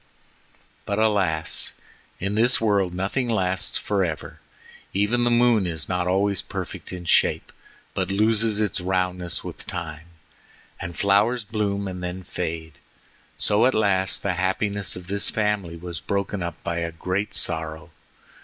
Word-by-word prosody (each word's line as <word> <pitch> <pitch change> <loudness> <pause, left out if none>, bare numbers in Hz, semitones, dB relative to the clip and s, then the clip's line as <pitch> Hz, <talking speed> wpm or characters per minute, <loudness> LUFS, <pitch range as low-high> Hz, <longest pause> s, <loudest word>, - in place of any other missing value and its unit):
But, 100 - 0
alas! 100 -8 +1 0.5
in 100 +2 -1
this 120 +4 +3
world 100 -5 +2
nothing 100 +7 -1
lasts 95 -4 +1
forever. 95 -6 -1 0.6
Even 105 +5 +2
the - - +4
moon 120 -4 +4
is 80 -3 -3
not 90 -1 0
always 100 +1 +2
perfect - - -6
in 90 -1 -6
shape, - - +3 0.4
but - - -1
loses 110 +1 +3
its 105 -3 0
roundness 90 -1 -1
with - - -8
time, 80 -1 -5 0.7
and 85 0 -6
flowers 105 +4 +3
bloom 100 -2 -1
and 90 -1 -5
then 90 +1 -4
fade. 80 -3 -4 0.6
So 105 +4 +4
at 130 - +1
last 95 -3 +2
the 100 - +1
happiness 95 +2 0
of 90 - -8
this 100 +2 0
family 105 -6 0
was 85 -1 -6
broken 100 0 -1
up 85 0 -3
by 85 0 -1
a 85 0 -2
great 95 +5 -2
sorrow. 80 0 -1
95 Hz, 145 wpm, -24 LUFS, 90-105 Hz, 0.7 s, the